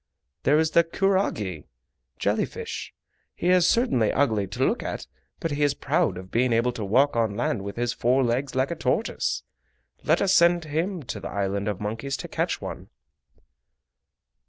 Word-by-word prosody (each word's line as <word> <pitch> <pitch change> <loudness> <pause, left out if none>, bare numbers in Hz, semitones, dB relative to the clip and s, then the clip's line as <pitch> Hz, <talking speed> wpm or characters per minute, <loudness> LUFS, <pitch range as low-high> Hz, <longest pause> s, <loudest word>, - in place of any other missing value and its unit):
There 145 +3 +4
is 160 0 +2
the 170 - +5
kurage 165 - 0 0.5
(jelly - - +1
fish). - - -6 0.4
He 175 - -1
is 180 -1 +5
certainly 230 - +2
ugly 110 -8 +1
to 95 - -1
look - - 0
at, - - -4 0.3
but 165 - -2
he 145 +1 -2
is 145 -1 +3
proud 95 - 0
of 95 0 -10
being 125 +1 +2
able 115 +2 +2
to 115 -3 -5
walk 130 +8 +3
on 110 -3 0
land 120 -4 0
with 100 0 -6
his 120 0 -1
four 130 +3 +2
legs 130 +3 -1
like 130 +3 +1
a - - -2
tortoise. 215 +7 -1 0.6
Let - - +3
us 195 -1 +2
send 170 -2 +4
him 165 +3 -2
to 120 - -5
the - - -6
Island 100 0 -2
of 105 -3 -2
Monkeys 115 +6 -3
to - - -6
catch - - -1
one." - - -7
130 Hz, 180 wpm, -25 LUFS, 105-165 Hz, 0.6 s, the